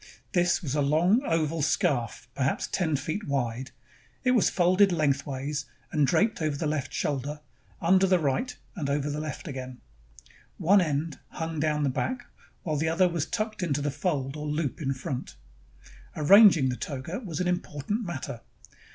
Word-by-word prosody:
This 175 0 +2
was 140 -4 -2
a 150 - +1
long 165 - +3
oval 165 0 0
scarf, 135 - 0
perhaps 135 +1 0
ten 160 -5 0
feet 160 +9 -3
wide. 130 -2 -2 0.5
It 250 - +3
was 240 -5 +4
folded 185 +2 +4
lengthwise 140 -2 -1 0.3
and 150 -3 +3
draped 215 - +2
over 155 -2 0
the 160 - -2
left 145 -3 -1
shoulder, 145 +1 -2 0.4
under 185 +2 +4
the 185 0 +4
right, 155 - -1 0.2
and 150 -7 -3
over 145 +1 0
the 150 - -3
left 155 0 -5
again. 130 -3 -6 0.8
One 195 +4 +5
end 150 -2 -2
hung 160 -1 -4
down 150 0 +1
in 150 - 0
the 140 - +2
back, 245 - -2 0.4
while 155 -3 -1
the 160 +2 +1
other 180 +3 +3
was 170 -2 -2
tucked 215 -2 -3
into 150 -5 0
the 145 - 0
fold 140 -4 -2
or 150 0 -5
loop 150 0 -2
in 135 -2 -1
front. 130 - -5 0.8
Arranging 165 -3 +7
the 125 - -2
toga 145 - -5
was 180 - -5
an 180 - 0
impor 175 -6 -2
tant 210 +7 0
matter. 140 - -5
155 Hz, 175 wpm, -27 LUFS, 140-175 Hz, 0.8 s, Arranging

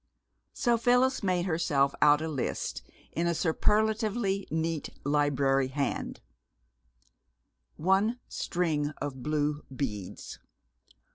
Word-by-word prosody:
So 235 -2 +2
Phyllis 250 +3 +3
made 180 -2 +1
herself 145 -5 +2
out 150 +1 +6
a - - -2
list 145 -5 -3 0.3
in 170 +1 -1
a 170 - +1
superlatively 210 +3 +1
neat 160 -1 -1 0.2
library 140 -2 +2
hand: 140 +1 -3 1.5
One 195 +8 +2
string 155 -4 -1
of 135 -3 -4
blue 150 +1 -1
beads. 105 -9 -5
160 Hz, 95 wpm, -29 LUFS, 145-195 Hz, 1.5 s, out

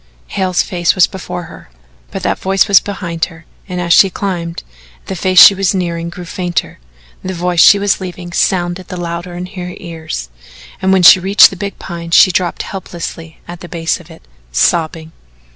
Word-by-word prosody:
Hale's 185 -2 0
face 175 -2 0
was 185 - +5
before 180 -1 -7
her, - - -13 0.4
but - - -7
that - - -1
voice 195 0 +1
was 200 - +6
behind, 170 -5 -4 0.4
and 180 -1 -4
as 170 -1 +1
she 195 - +6
climbed, 175 -3 -4 0.4
the 190 - -5
face 185 +1 +3
that - - +12
she - - +7
was 195 0 0
nearing 170 -2 -3
grew 175 +1 -9
fainter, 175 - -4 0.4
the 190 0 -4
voice 175 0 -1
she 200 - +7
was 200 -1 0
leaving 180 -1 -8
sounded 175 0 -1
the 180 - -7
louder 175 0 -5
in 180 +1 -5
her 180 -1 -8
ears, 160 - -7 0.5
and 190 0 +1
when 190 -1 +3
she 180 - +9
reached 195 +3 +6
the - - -7
big 200 +1 -6
Pine 170 -2 -8
she 185 +3 +6
dropped 175 -1 -2
helplessly 170 -3 -8
at 175 0 -9
the 175 - -11
base 165 -1 -2
of - - -16
it, - - -15 0.3
sobbing. 160 - 0
180 Hz, 190 wpm, -14 LUFS, 170-190 Hz, 0.5 s, that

